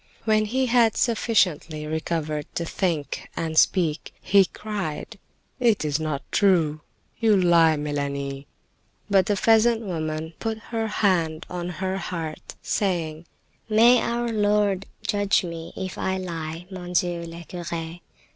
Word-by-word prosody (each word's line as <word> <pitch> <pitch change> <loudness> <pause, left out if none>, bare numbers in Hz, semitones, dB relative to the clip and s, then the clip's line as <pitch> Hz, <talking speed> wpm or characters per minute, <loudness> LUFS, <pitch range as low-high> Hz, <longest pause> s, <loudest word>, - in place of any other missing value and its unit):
When 215 -1 +3
he 260 +5 0
had 235 -2 +3
sufficiently 180 - +1
recovered 155 -1 -2
to 170 - -1
think 165 -4 -2
and 160 -1 -2
speak 160 -2 +2
he 200 -1 +5
cried: 195 -7 -5 0.4
"It 230 -9 +2
is 145 0 0
not 155 -3 -3
true; 165 -7 +3 0.4
you 220 -3 +4
lie, 170 -3 +5
Melanie!" 140 -1 -3 0.6
But 190 -2 +4
the 205 - +2
peasant 225 +2 +4
woman 160 -4 -4
put 225 -1 -2 0.2
her 225 -1 0
hand 170 -7 +1
on 175 0 -3
her 185 +2 -3
heart, 165 -4 -5
saying: 170 -5 -1 0.4
"May 235 +3 +6
our 235 0 -1
Lord 205 -2 +1 0.2
judge 205 -1 +2
me 165 -2 -6
if 185 -1 -5
I 190 0 0
lie, 165 -2 -5
Monsieur 175 -1 -1
le 170 +1 -9
Cure! 170 -1 -6
175 Hz, 130 wpm, -24 LUFS, 160-205 Hz, 0.6 s, May